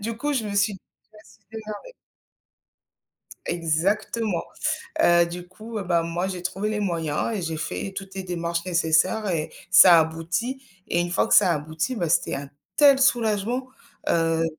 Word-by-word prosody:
du 225 Hz, +2 st, -4 dB
coup 290 Hz, +5 st, -2 dB
je 255 Hz, -5 st, -1 dB
me 205 Hz, -1 st, -4 dB
suis 200 Hz, +1 st, +2 dB
dit: 190 Hz, -, -12 dB, 0.2 s
«Tu -, -, -46 dB
vas 215 Hz, -, -17 dB
se -, -, -20 dB
démerder». 220 Hz, -, -8 dB, 1.5 s
Exactement, 175 Hz, +5 st, -1 dB, 0.6 s
heu, 170 Hz, 0 st, +5 dB
du 175 Hz, +1 st, -7 dB
coup, 220 Hz, +4 st, -8 dB
heu, 200 Hz, -, -4 dB
bah 170 Hz, -2 st, +1 dB
moi 170 Hz, +2 st, -2 dB
j'ai 185 Hz, -2 st, -5 dB
trouvé 190 Hz, +3 st, -2 dB
les 215 Hz, -1 st, -2 dB
moyens 165 Hz, -1 st, -1 dB
et -, -, -3 dB
j'ai 165 Hz, -1 st, -3 dB
fait 195 Hz, +4 st, -4 dB
toutes 195 Hz, -1 st, -7 dB
les 190 Hz, -, -4 dB
démarches 170 Hz, -1 st, -3 dB
nécessaires 180 Hz, +5 st, +2 dB
et 160 Hz, -3 st, -2 dB, 0.2 s
ça 180 Hz, -2 st, +9 dB
a -, -, +7 dB
abouti 175 Hz, +11 st, -2 dB, 0.3 s
et -, -, +1 dB
une 175 Hz, 0 st, -2 dB
fois 190 Hz, -, +1 dB
que -, -, +4 dB
ça 190 Hz, -4 st, +6 dB
a -, -, +1 dB
abouti, 155 Hz, -, -3 dB
bah, 175 Hz, -8 st, -2 dB
c'était 160 Hz, -, +1 dB
un 140 Hz, 0 st, -6 dB, 0.3 s
tel 280 Hz, -2 st, +6 dB
soulagement, 240 Hz, -1 st, +1 dB, 0.4 s
heu 165 Hz, -1 st, +2 dB
185 Hz, 185 wpm, -24 LUFS, 170-215 Hz, 1.5 s, ça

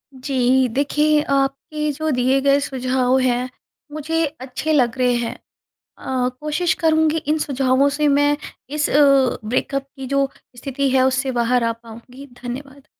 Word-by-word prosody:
जी, 260 Hz, -1 st, +1 dB
देखिए 295 Hz, +4 st, +1 dB
आपके 275 Hz, +2 st, -1 dB
जो 315 Hz, +2 st, -3 dB
दिए 260 Hz, +1 st, +2 dB
गए 280 Hz, +1 st, +3 dB
सुझाव 260 Hz, -1 st, 0 dB
हैं, 250 Hz, 0 st, 0 dB, 0.4 s
मुझे 320 Hz, +2 st, -1 dB, 0.2 s
अच्छे 265 Hz, +4 st, -3 dB
लग 250 Hz, -4 st, +2 dB
रहे 250 Hz, -1 st, +2 dB
हैं। 240 Hz, -1 st, -2 dB, 0.7 s
अ, 255 Hz, -1 st, -1 dB
कोशिश 305 Hz, +4 st, 0 dB
करुँगी 315 Hz, -1 st, +3 dB
इन 310 Hz, +1 st, +2 dB
सुझावों 270 Hz, -1 st, +1 dB
से 300 Hz, 0 st, +2 dB
मैं 290 Hz, +1 st, +3 dB, 0.3 s
इस 300 Hz, 0 st, -1 dB
अ, -, -, -2 dB, 0.5 s
ब्रेकअप 270 Hz, +4 st, -2 dB
की 270 Hz, -1 st, -7 dB
जो 275 Hz, +1 st, +1 dB, 0.3 s
स्थिति 275 Hz, +2 st, -2 dB
है 260 Hz, 0 st, +3 dB
उससे 265 Hz, +1 st, 0 dB
बाहर 240 Hz, +1 st, +2 dB
आ 230 Hz, -, +1 dB
पाऊँगी, 235 Hz, +4 st, -13 dB, 0.2 s
धन्यवाद। 270 Hz, +3 st, -8 dB
270 Hz, 150 wpm, -20 LUFS, 255-290 Hz, 0.7 s, गए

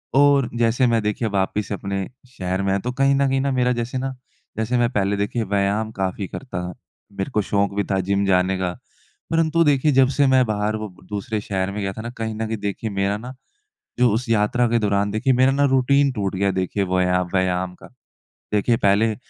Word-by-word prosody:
और 140 Hz, -2 st, +4 dB
जैसे 120 Hz, +2 st, +2 dB
मैं 115 Hz, -1 st, +2 dB
देखिए 105 Hz, +2 st, -1 dB
वापस 100 Hz, +1 st, -1 dB
अपने 100 Hz, -1 st, -3 dB, 0.3 s
शहर 95 Hz, +1 st, -2 dB
में 95 Hz, -, 0 dB
आया। 100 Hz, -, +1 dB
तो 125 Hz, +5 st, -3 dB
कहीं 135 Hz, +2 st, +2 dB
न 140 Hz, 0 st, +2 dB
कहीं 135 Hz, 0 st, +1 dB
न 140 Hz, 0 st, 0 dB
मेरा 125 Hz, -1 st, +2 dB
जैसे 120 Hz, +3 st, -3 dB
न, 135 Hz, +1 st, -3 dB, 0.4 s
जैसे 110 Hz, +3 st, 0 dB
मैं 120 Hz, 0 st, +2 dB
पहले 100 Hz, -2 st, 0 dB
देखिए 105 Hz, +3 st, -1 dB
व्यायाम 100 Hz, +2 st, 0 dB
काफ़ी 95 Hz, -1 st, -3 dB
करता 95 Hz, -10 st, -6 dB
था। 90 Hz, -, -6 dB, 0.4 s
मेरे 95 Hz, -1 st, -4 dB
को 105 Hz, -, +1 dB
शौक़ 100 Hz, 0 st, 0 dB
भी 100 Hz, -, +1 dB
था 95 Hz, -, +2 dB
जिम 100 Hz, +2 st, 0 dB
जाने 95 Hz, 0 st, +2 dB
का। 95 Hz, -1 st, -1 dB, 0.6 s
परंतु 165 Hz, 0 st, +3 dB
देखिए 145 Hz, -1 st, +3 dB
जब 135 Hz, -1 st, +5 dB
से 140 Hz, -2 st, +4 dB
मैं 130 Hz, -1 st, +4 dB
बाहर 105 Hz, -1 st, -1 dB
वो 110 Hz, -3 st, -6 dB
दूसरे 105 Hz, +1 st, -4 dB
शहर 95 Hz, -1 st, -2 dB
में 105 Hz, +1 st, -4 dB
गया 95 Hz, -1 st, -2 dB
था 110 Hz, -, -7 dB
ना 120 Hz, -, -5 dB
कहीं 110 Hz, -1 st, -3 dB
न 110 Hz, +1 st, -3 dB
कहीं 110 Hz, 0 st, -3 dB
देखिए 100 Hz, +2 st, -3 dB
मेरा 100 Hz, 0 st, -1 dB
ना 125 Hz, +4 st, -8 dB, 0.7 s
जो 125 Hz, -1 st, +4 dB
उस 115 Hz, +3 st, -2 dB
यात्रा 115 Hz, +2 st, +2 dB
के 120 Hz, -, +2 dB
दौरान 100 Hz, -1 st, +1 dB
देखिए 110 Hz, +6 st, +1 dB
मेरा 130 Hz, +2 st, +4 dB
ना 145 Hz, +1 st, +2 dB
रूटीन 140 Hz, +2 st, +3 dB
टूट 100 Hz, -5 st, -2 dB
गया 100 Hz, +1 st, +1 dB
देखिए 95 Hz, +2 st, -1 dB
वया 90 Hz, 0 st, +2 dB
व्यायाम 90 Hz, -1 st, 0 dB
का। -, -, -15 dB, 0.7 s
देखिए 115 Hz, +3 st, +2 dB
पहले 105 Hz, +3 st, +2 dB
105 Hz, 215 wpm, -22 LUFS, 100-125 Hz, 0.7 s, जब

